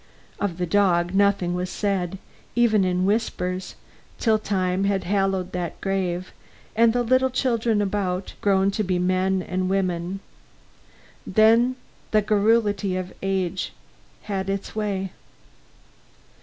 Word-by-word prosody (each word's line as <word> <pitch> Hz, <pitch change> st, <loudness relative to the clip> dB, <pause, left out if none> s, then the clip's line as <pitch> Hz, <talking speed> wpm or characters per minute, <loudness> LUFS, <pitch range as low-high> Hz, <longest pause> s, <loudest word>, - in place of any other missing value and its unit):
Of 195 Hz, -4 st, -2 dB
the 180 Hz, -, -1 dB
dog, 175 Hz, -1 st, +2 dB
nothing 200 Hz, -3 st, +2 dB
was 180 Hz, +1 st, -2 dB
said, 195 Hz, -2 st, -1 dB, 0.4 s
even 225 Hz, -4 st, +4 dB
in 185 Hz, 0 st, +1 dB
whispers, 185 Hz, -3 st, -1 dB, 0.4 s
till 220 Hz, -2 st, +2 dB
time 190 Hz, -2 st, 0 dB
had 195 Hz, -1 st, +1 dB
hallowed 195 Hz, -1 st, 0 dB
that 175 Hz, -2 st, -4 dB
grave, 185 Hz, -2 st, -2 dB, 0.4 s
and 230 Hz, +1 st, +5 dB
the 245 Hz, +1 st, +1 dB
little 255 Hz, +2 st, +3 dB
children 230 Hz, -4 st, +1 dB
about, 190 Hz, -2 st, -2 dB
grown 195 Hz, -1 st, +3 dB
to 215 Hz, -, -1 dB
be 185 Hz, -2 st, 0 dB
men 185 Hz, +1 st, +1 dB
and 185 Hz, +1 st, -2 dB
women. 185 Hz, -1 st, -1 dB, 1.1 s
Then 230 Hz, +5 st, +4 dB, 0.3 s
the 215 Hz, -1 st, +3 dB
garrulity 210 Hz, -2 st, +2 dB
of 185 Hz, 0 st, -5 dB
age 190 Hz, -1 st, -1 dB, 0.5 s
had 195 Hz, -2 st, -3 dB
its 195 Hz, +1 st, -4 dB
way. 195 Hz, -3 st, -2 dB
195 Hz, 125 wpm, -24 LUFS, 185-210 Hz, 1.1 s, and